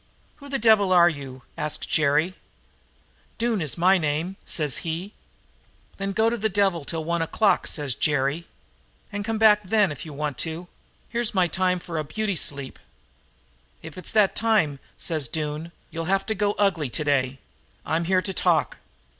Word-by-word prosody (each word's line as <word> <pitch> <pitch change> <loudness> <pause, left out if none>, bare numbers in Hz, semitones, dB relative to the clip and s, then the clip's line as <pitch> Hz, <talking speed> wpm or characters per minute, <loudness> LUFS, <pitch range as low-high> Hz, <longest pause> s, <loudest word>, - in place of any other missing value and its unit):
"'Who 285 -1 -12
the 275 - 0
devil 215 -4 +4
are 175 -1 +7
you?' 135 -5 -8
asks 150 0 -3
Jerry. 155 +3 +2 1.0
"'Doone 230 -3 0
is 155 -1 -2
my 185 +2 +5
name,' 160 +4 -1
says 150 -5 0
he. 170 +6 -4 0.8
"'Then 195 0 -2
go 220 +3 +3
to 235 +1 +1
the 220 0 0
devil 195 -4 +1
till 160 +1 -3
one 170 +1 -1
o'clock,' 200 +6 +2
says 145 -4 -1
Jerry. 145 +4 0 0.6
'And 205 0 -3
come 225 +1 -2
back 215 -1 +6
then 205 -1 +3
if 145 - -6
you 155 - -8
want 145 -2 -3
to. 165 +2 -4 0.4
Here's 235 -2 -1
my 185 -1 +4
time 180 +1 +1
for 170 -2 -5
a - - -1
beauty 205 +6 -2
sleep.' 140 -4 -4 1.0
"'If 160 -2 -9
it's 185 - -2
that 210 -3 +4
time,' 210 -11 +2 0.2
says 155 -6 -1
Doone, 155 +3 -3 0.2
'you'll 165 0 -4
have 195 +3 +1
to 220 - -1
go 205 0 0
ugly 180 -10 +1
today. 135 -1 0 0.5
I'm 165 +1 0
here 185 +1 +2
to 195 - -3
talk.' - - +2
175 Hz, 170 wpm, -25 LUFS, 150-205 Hz, 1.0 s, are